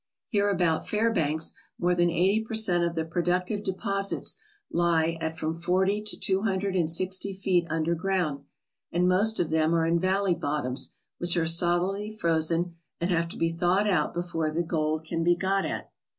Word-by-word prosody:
Here 205 -2 +2
about 175 -5 +1
Fairbanks 165 -8 +1 0.3
more 175 +1 +2
than 175 0 +2
eighty 190 +6 +2
per 220 0 -5
cent, 180 -6 +3
of 170 0 -1
the 160 -1 -1
productive 180 +4 -1
de 195 - 0
posits 195 +1 -1 0.4
lie 165 -1 +2
at 160 0 -3
from 160 0 -2
forty 190 +4 +1
to 210 0 -1
two 190 0 +1
hundred 195 -2 -1
and 170 -4 +1
sixty 185 +3 +1
feet 185 -3 +1
under 165 +1 0
ground, 170 -5 -1 0.5
and 180 +1 +2
most 205 +5 +3
of 165 - 0
them 160 +1 +2
are 165 -1 +2
in 170 +1 +2
valley 190 +1 +1
bottoms 145 -5 -2 0.2
which 175 0 +2
are 165 - +2
solidly 175 +5 +1
frozen 170 -3 0 0.2
and 170 +2 -1
have 170 -1 +1
to - - -8
be 165 - +1
thawed 180 +5 +1
out 190 -4 +1
before 175 -2 -2
the 165 +3 -1
gold 155 -1 -1
can 165 +1 -2
be 175 +1 +4
got 195 +2 0
at. - - -5
175 Hz, 185 wpm, -27 LUFS, 165-190 Hz, 0.5 s, be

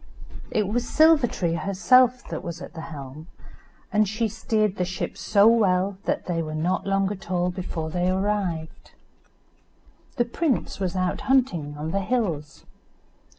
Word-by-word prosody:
It 210 -2 0
was 240 +4 -2
Silver 315 -4 +5
tree 170 -6 -2
herself 235 +9 +3
that - - -5
was 170 0 -6
at 180 - -9
the 165 - -7
helm, 150 -1 -9 0.7
and 210 -1 +3
she 220 +2 0
steered 215 -1 -1
the 180 - +1
ship 185 +1 -4
so 200 -1 +3
well 195 -4 +3
that - - -1
they 170 -2 -1
were 155 -1 -5
not 175 +5 -1
long 195 0 +1
at 190 -3 -8
all 180 0 +1
before 165 -3 -5
they 180 +2 0
arrived. 190 -4 -2 1.2
The 240 - +1
prince 270 -1 -1
was 185 -2 -2
out 185 -1 -1
hunting 175 - +1
on 155 +2 -4
the 195 - 0
hills. 180 - -2
190 Hz, 155 wpm, -25 LUFS, 170-215 Hz, 1.2 s, Silver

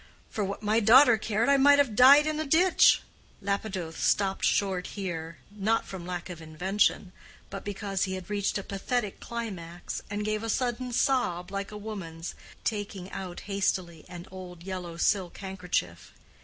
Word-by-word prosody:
For 210 - -2
what 200 +2 -4
my 215 +2 +3
daughter 240 +3 +7
cared, 220 +1 0
I 280 0 +5
might 285 +1 +6
have 275 -7 +2
died 275 +5 +8
in 310 0 -1
a - - 0
ditch." 350 +5 +5 0.4
Lapidoth 195 -4 -3
stopped 195 -1 +1
short 190 -3 +1
here, 165 -4 -4
not 210 +2 0
from 180 -2 -8
lack 175 -1 -4
of 175 -3 -8
invention, 180 +4 0 0.4
but 195 - -6
because 200 -1 -2
he 190 0 -3
had 185 -2 -7
reached 205 -1 -1
a 200 - -4
pathetic 205 +2 -3
climax, 185 -8 -6
and 205 +1 -3
gave 215 0 -1
a 225 - -4
sudden 250 +1 -1
sob, 200 -8 0
like 200 0 -3
a 210 - -7
woman's, 185 -6 -6 0.3
taking 205 -3 -4
out 180 -2 -6
hastily 185 -5 -2
an 175 0 -8
old 180 -2 -10
yellow 180 -3 -6
silk 185 0 +1
handkerchief. 180 - -3
200 Hz, 165 wpm, -28 LUFS, 180-220 Hz, 0.4 s, died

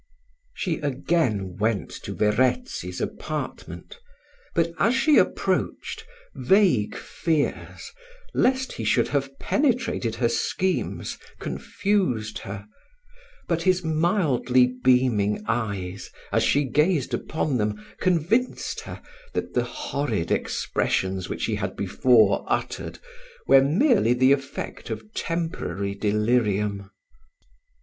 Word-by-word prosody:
She 175 -5 -2
again 130 - 0
went 110 -1 0
to - - -5
Verezzi's 130 - 0
apartment, - - -5 0.6
but, 165 0 +1
as 230 +5 +3
she 300 +3 +5
approached, 445 0 -1 0.3
vague 185 - +3
fears, 160 -4 -2 0.4
lest 260 0 +1
he - - -5
should - - +2
have 135 -1 -2
penetrated 245 - 0
her 120 +1 +1
schemes 180 +10 -1 0.2
confused 130 - -1
her: 100 +1 -7 0.8
but 170 -1 0
his 185 0 +2
mildly 155 - +2
beaming 125 -6 +3
eyes, 100 -5 -3 0.2
as - - +2
she 145 - +3
gazed 150 +2 +1
upon 155 -4 -1
them, 105 0 -2
convinced 185 +8 +1
her, - - -9 0.3
that - - -3
the - - +1
horrid 145 - -2
expressions 95 -1 -1
which - - -2
he - - -1
had - - -3
before 110 -6 +3
uttered, - - -2 0.5
were 135 - +7
merely 175 - +3
the 130 +2 +4
effect 140 -3 -2
of 110 -1 -6
temporary 100 - -3
delirium. 105 -1 0
130 Hz, 105 wpm, -25 LUFS, 105-175 Hz, 0.8 s, were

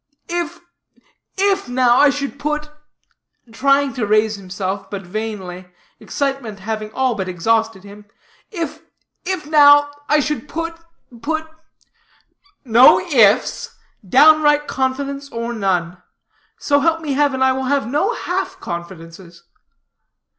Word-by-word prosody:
"If 345 0 -3 0.8
if, 390 -4 +1
now, 245 -1 +3
I 290 - +6
should 280 0 -4
put" 300 0 -3 0.8
trying 275 +3 +2
to 235 -5 -3
raise 215 +1 +2
himself, 195 0 -5
but 200 -1 -6
vainly, 185 -2 -6 0.3
excitement 270 -8 -4
having 215 +1 -5
all 260 -1 0
but 190 -4 -4
exhausted 220 +3 0
him 205 +1 -13 0.4
"if, 340 -7 -5 0.4
if 370 -4 -3
now, 290 -1 +6 0.2
I 300 - +4
should 295 +1 -3
put, 330 +1 -4 0.5
put 315 +4 -3 0.7
" 390 -6 -37
"No 255 - +8
ifs. 230 - +2 0.3
Downright 295 - +4
confidence, 275 +1 -3
or 235 +1 -4
none. 180 -5 -2 0.6
So 285 -1 +1
help 325 +2 +1
me 295 -3 -3
heaven, 275 -2 +1
I 265 - +4
will 265 0 -2
have 280 +1 0
no 305 - 0
half 380 +1 -4
confidences." 170 0 -9
265 Hz, 125 wpm, -19 LUFS, 205-300 Hz, 0.8 s, No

